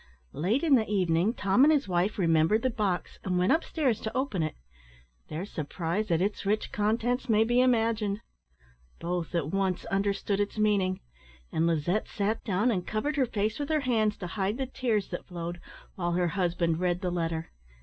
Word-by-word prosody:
Late 200 - 0
in 315 -4 +4
the 225 -4 +4
evening, 185 +2 +2
Tom 200 +6 +3
and 300 - +7
his 290 -6 +2
wife 180 +3 0
remembered 165 +4 +3
the 260 - +2
box, 205 -5 -2
and 180 -2 0
went 180 +1 +3
up 320 - +3
stairs 260 -9 0
to 220 - -3
open 260 -9 -1
it. 155 -1 -2 0.7
Their 165 +5 -4
surprise 170 +4 -3
at 170 +1 +2
its 205 +1 -2
rich 210 +2 0
contents 235 +5 0
may 220 0 +5
be 240 +2 +3
imagined. 225 -4 +1 0.8
Both 175 0 -3
at 160 -2 -1
once 195 -2 0
understood 195 0 0
its 205 +1 -1
meaning; 200 -3 +1 0.5
and 160 +1 +1
Lizette 170 +5 0
sat 210 +2 -1
down, 210 +4 +1
and 180 -5 -2
covered 285 +8 -1
her 265 -4 +2
face 215 +2 -1
with 290 0 -3
her 310 -1 +2
hands, 220 -5 +1
to 180 - -6
hide 195 +4 -2
the 270 - -1
tears 235 -6 -1
that - - -6
flowed, 175 -1 -5 0.3
while 175 -2 -2
her 175 0 +1
husband 170 -3 0
read 180 0 0
the 180 -2 -1
letter. 165 -2 -2
200 Hz, 190 wpm, -28 LUFS, 175-225 Hz, 0.8 s, and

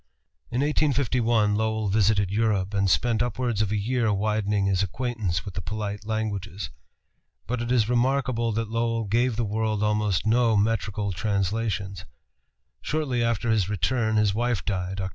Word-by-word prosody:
In 125 - -1
1851 125 -7 +2
Lowell 110 0 0
visited 100 -1 +2
Europe, 105 -2 0
and 100 -1 +2
spent 115 +3 +2
upwards 120 -2 -1
of 105 -2 0
a 105 - +1
year 115 +1 0
widening 105 0 0
his 95 -1 +2
acquaintance 100 -4 -2
with 100 - -6
the 95 - -4
polite 105 +1 -5
languages. 100 - -3 0.7
But 120 0 -2
it 120 +1 -2
is 115 -4 +3
remarkable 125 -1 +1
that 115 0 -2
Lowell 115 0 0
gave 115 +4 +1
the 115 +1 -1
world 110 0 -1
almost 105 -4 +1
no 115 0 +3
metrical 105 -1 0
translations. 100 -1 -2 0.8
Shortly 135 -6 -1
after 115 0 0
his 105 -4 +1
return 110 +4 0
his 105 -2 +3
wife 120 -1 -1
died 95 -1 -2
(Oct. 95 -1 -2
110 Hz, 155 wpm, -25 LUFS, 100-115 Hz, 0.8 s, is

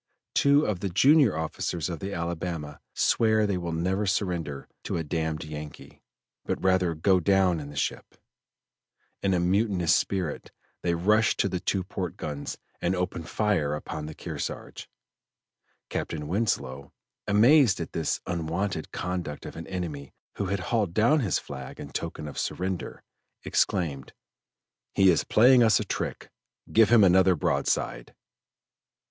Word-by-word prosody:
Two 140 +2 +4
of 100 -4 -1
the 100 - -2
junior 130 - +5
officers 80 +1 -2
of 85 -3 -5
the 95 - -5
Alabama 85 -4 -4 0.2
swear 110 -1 +3
they 100 -2 0
will 85 -1 -4
never 95 +5 -1
surrender 85 -8 -2 0.2
to - - -2
a 80 - -2
"damned 80 0 -2
Yankee," 75 -1 -9 0.4
but - - -2
rather 95 -3 +2
go 90 +4 +3
down 95 -2 +3
in 70 -1 -7
the 75 - -11
ship; - - -3 1.1
in 95 -1 +2
a - - +2
mutinous 95 -1 +2
spirit 90 -6 -2 0.3
they 85 -1 0
rush 105 +6 +3
to - - +2
the 90 -2 -2
two 95 +1 -1
port 90 -2 -5
guns 75 -2 -5 0.2
and 90 +2 +1
open 90 -2 -2
fire 85 -4 0
upon 75 0 -6
the 80 - -8
Kearsarge. - - -6 1.0
Captain 75 -2 -4
Winslow, 70 - -2 0.4
amazed 115 +2 +5
at 85 - -5
this 80 - -1
unwonted 85 0 -2
conduct 90 -5 -4
of - - -8
an 80 - -8
enemy 80 -7 -5 0.2
who 100 - -1
had 100 0 -1
hauled 100 -7 +1
down 120 +8 +4
his 110 -9 +1
flag - - -8
in - - -8
token 75 - -5
of 75 - -6
surrender, 90 -1 -3 0.4
exclaimed: 70 -8 0 0.8
"He 95 -1 +6
is 85 - +1
playing 125 +3 +6
us 110 -3 +5
a - - -1
trick, - - -4 0.4
give 110 -1 +6
him 115 -2 +7
another 95 0 +5
broadside." 75 - -1
90 Hz, 150 wpm, -27 LUFS, 80-100 Hz, 1.1 s, him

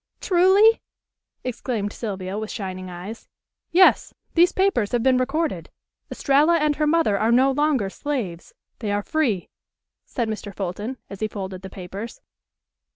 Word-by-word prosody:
Truly?" 390 +5 +5 0.6
exclaimed 230 -4 -3
Sylvia 195 -4 -5
with 220 0 -5
shining 185 -2 -5
eyes. 180 +6 -8 0.4
"Yes. 370 +2 +4 0.2
These 350 +1 +5
papers 375 - +1
have 240 -2 +1
been 260 -1 +4
recorded. 255 - -1 0.4
Estralla 295 +5 +3
and 300 -2 +1
her 305 0 +1
mother 300 -11 +2
are 225 +2 +2
no 260 +3 +5
longer 285 -6 +1
slaves. 200 - -4 0.3
They 215 -4 -2
are 205 0 0
free," 235 - 0 0.6
said 235 -4 -2
Mr. 215 -1 -5
Fulton, 205 +7 -4
as 195 - -8
he 215 - 0
folded 190 -3 -6
the 190 - -8
papers. 195 +5 -8
230 Hz, 145 wpm, -23 LUFS, 195-300 Hz, 0.6 s, Truly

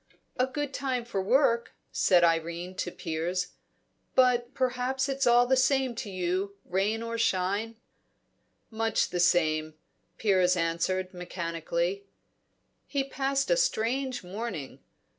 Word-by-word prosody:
"A 255 +1 +1
good 285 +1 -4
time 260 -4 -2
for 200 -5 -2
work," 235 +2 +2 0.2
said 180 -2 +4
Irene 170 +2 0
to 180 - -2
Piers. 170 +2 -3 0.7
"But 245 -1 +3
perhaps 255 +1 0
it's 275 -1 0
all 240 0 +6
the 265 +2 +3
same 260 -1 +2
to 215 - -4
you, 185 +2 -2
rain 205 +5 0
or 230 0 -4
shine? 200 +2 0 1.0
"Much 225 0 0
the 175 - -2
same," 155 -3 +2 0.4
Piers 185 -4 +3
answered 175 +3 -1
mechanically. 175 +2 -3 0.8
He 280 -2 0
passed 275 - -1
a - - +6
strange 260 - 0
morning. 185 - -6
210 Hz, 125 wpm, -28 LUFS, 180-255 Hz, 1.0 s, all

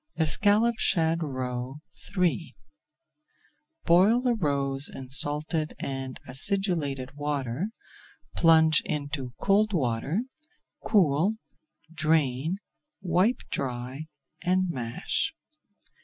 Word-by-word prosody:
ESCALLOPED 205 +8 +3
SHAD 165 0 +2
ROE 130 -2 -4 0.4
III 175 -2 0 1.3
Boil 190 +8 +5
the 250 -1 +1
roes 140 -7 +1
in 130 -1 -9
salted 150 +3 +4
and 135 -1 -5
acidulated 145 -3 -1
water, 145 - -3 0.7
plunge 160 -2 +5
into 145 -4 -4
cold 210 +2 +2
water, 140 - -1 0.6
cool, 180 0 +2 0.6
drain, 155 0 0 0.5
wipe 185 +7 +1
dry, 130 +3 -4 0.4
and 185 +1 +1
mash. 120 -5 -2
155 Hz, 80 wpm, -27 LUFS, 135-180 Hz, 1.3 s, Boil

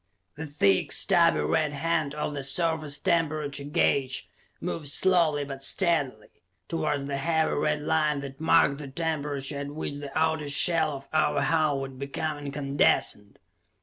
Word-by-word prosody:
The 160 +1 -7
thick, 100 -10 +1
stubby 75 0 +4
red 140 - 0
hand 155 -1 -1
of 150 0 -3
the 140 - -4
surface 155 0 0
temperature 155 -4 -1
gauge 140 -2 0 0.3
moved 155 -3 -4
slowly 165 -2 +2
but 135 -1 -8
steadily 145 - 0 0.3
towards 155 -4 -2
the 140 0 -3
heavy 160 +2 +1
red 150 0 0
line 150 -2 +1
that 135 +1 -9
marked 160 -3 +3
the 145 - -7
temperature 145 -2 -3
at 140 - -4
which 145 0 -5
the 145 -1 -7
outer 160 -2 0
shell 155 +1 +2
of 135 0 -9
our 155 - +2
hull 155 -3 +1
would 135 -1 -7
become 145 +2 -3
incandescent. 140 -7 0
145 Hz, 150 wpm, -27 LUFS, 140-160 Hz, 0.3 s, stubby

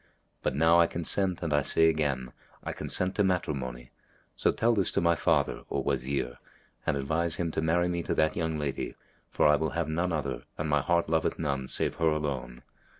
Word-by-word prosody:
But - - -1
now 80 +3 +5
I 85 - +6
consent 90 +2 0
and 80 -3 -1
I 75 - +4
say 80 +4 +3
again, 70 -5 0 0.3
I - - -4
consent 95 +1 -2
to 105 - +4
matrimony: 65 -10 -2 0.4
so - - +2
tell 120 +1 +2
this 100 -4 +2
to - - +2
my 85 0 +3
father, 80 - +1
O - - -1
Wazir, 65 -2 -2 0.5
and - - +2
advise 80 +4 0
him 85 -2 -2
to 80 - -1
marry 85 +2 +2
me 85 -1 -1
to - - -2
that 80 0 +2
young 80 -2 -1
lady; 75 -2 -3 0.3
for - - +1
I 75 0 +6
will 80 +1 -1
have 85 - 0
none 85 +3 -1
other 70 -5 -3
and 80 - -2
my 75 -1 +2
heart 85 +4 +1
loveth 80 0 0
none 70 -4 -2
save - - 0
her 80 - +3
alone. 70 -6 -3
80 Hz, 205 wpm, -29 LUFS, 70-85 Hz, 0.5 s, I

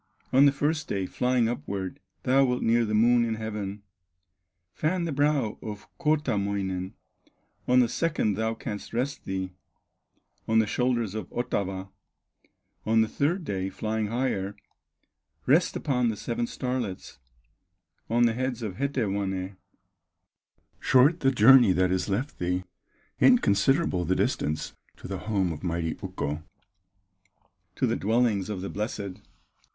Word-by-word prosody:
On 135 +2 +7
the - - +5
first 150 +3 -1
day, 95 -1 -1
flying 125 +3 +1
upward, 100 -5 -4 0.2
Thou 135 +2 +4
wilt 125 -1 0
near 115 +1 +3
the 105 0 -1
Moon 120 +2 +5
in 115 -1 -1
heaven, 105 -2 -5 0.9
Fan 175 +3 0
the 165 - -2
brow 145 -6 +1
of 105 -2 -7
Kootamoinen; 100 - 0 0.7
On 125 0 +5
the 120 - +3
second 150 -5 0
thou 110 +2 -1
canst 105 0 -6
rest 130 +4 -2
thee 95 -1 -3 0.9
On 110 - +2
the 110 - +5
shoulders 120 -2 0
of 110 -4 -5
Otava; 95 -6 -3 0.9
On 110 +1 +3
the 110 - +2
third 165 - 0
day, 95 -7 -2
flying 110 +2 -2
higher, 105 -4 -1 0.9
Rest 160 +7 +3
upon 125 -5 +1
the 110 - -3
seven 240 - -2
starlets, 125 - -4 0.9
On 120 +2 +3
the 115 -1 +4
heads 125 0 -2
of 95 -4 -4
Hetewanè; 100 -8 -2 1.2
Short 140 +6 +4
the 135 - +3
journey 120 -3 +7
that 90 0 +2
is 95 +2 0
left 125 +9 -2
thee, 90 +1 -1 0.6
Inconsiderable 135 - +3
the 95 +3 +1
distance 75 -3 -1 0.2
To - - -9
the 95 -1 -4
home 95 -4 0
of 75 - -9
mighty 85 -2 -1
Ukko, 75 +2 -3 1.3
To - - +1
the 115 -1 +1
dwellings 110 -3 +1
of 100 -3 -4
the 100 - -4
blessed." 100 -2 -4
110 Hz, 135 wpm, -27 LUFS, 95-130 Hz, 1.3 s, On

